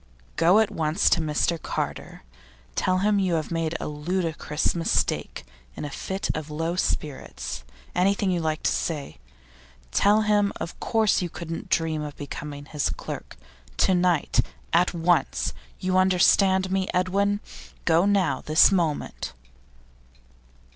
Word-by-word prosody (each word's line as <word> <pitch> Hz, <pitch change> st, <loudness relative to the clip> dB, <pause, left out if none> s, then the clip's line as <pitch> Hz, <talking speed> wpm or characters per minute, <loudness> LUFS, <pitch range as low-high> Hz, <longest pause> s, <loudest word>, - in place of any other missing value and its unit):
'Go 170 Hz, +5 st, +5 dB
at 220 Hz, -1 st, +3 dB
once 160 Hz, +3 st, +1 dB
to -, -, +4 dB
Mr 155 Hz, +2 st, 0 dB
Carter. -, -, -4 dB, 0.5 s
Tell 185 Hz, -, +1 dB
him 210 Hz, -1 st, +3 dB
you 185 Hz, -3 st, +1 dB
have 155 Hz, 0 st, -2 dB
made 165 Hz, -1 st, -1 dB
a -, -, -4 dB
ludicrous 155 Hz, 0 st, -1 dB
mistake 170 Hz, -1 st, -1 dB, 0.3 s
in -, -, -5 dB
a 145 Hz, -, -5 dB
fit 190 Hz, +7 st, -3 dB
of 155 Hz, -1 st, -5 dB
low 165 Hz, +3 st, -2 dB
spirits; 70 Hz, -, -3 dB, 0.3 s
anything 195 Hz, +1 st, +2 dB
you 175 Hz, -, 0 dB
like 155 Hz, -1 st, -2 dB
to -, -, +2 dB
say. 145 Hz, -, -3 dB, 0.7 s
Tell 210 Hz, +2 st, +4 dB
him 210 Hz, -1 st, +3 dB
you -, -, -3 dB
of 170 Hz, -, -6 dB
course 220 Hz, -4 st, +2 dB
couldn't 165 Hz, 0 st, -6 dB
dream 160 Hz, -2 st, +1 dB
of 150 Hz, -1 st, -6 dB
becoming 145 Hz, 0 st, -7 dB
his 150 Hz, -1 st, -1 dB
clerk. -, -, -7 dB, 0.4 s
To 190 Hz, -, +3 dB
night; 180 Hz, -3 st, +2 dB, 0.3 s
at 175 Hz, +1 st, +3 dB
once! 170 Hz, -2 st, +1 dB, 0.3 s
You 185 Hz, 0 st, +2 dB
understand 190 Hz, 0 st, +4 dB
me, 190 Hz, 0 st, 0 dB
Edwin? 200 Hz, +3 st, +1 dB, 0.5 s
Go 170 Hz, +3 st, +4 dB
now, 195 Hz, -7 st, +2 dB
this 155 Hz, +5 st, +5 dB
moment. 165 Hz, -, -1 dB
170 Hz, 140 wpm, -25 LUFS, 155-190 Hz, 0.7 s, Go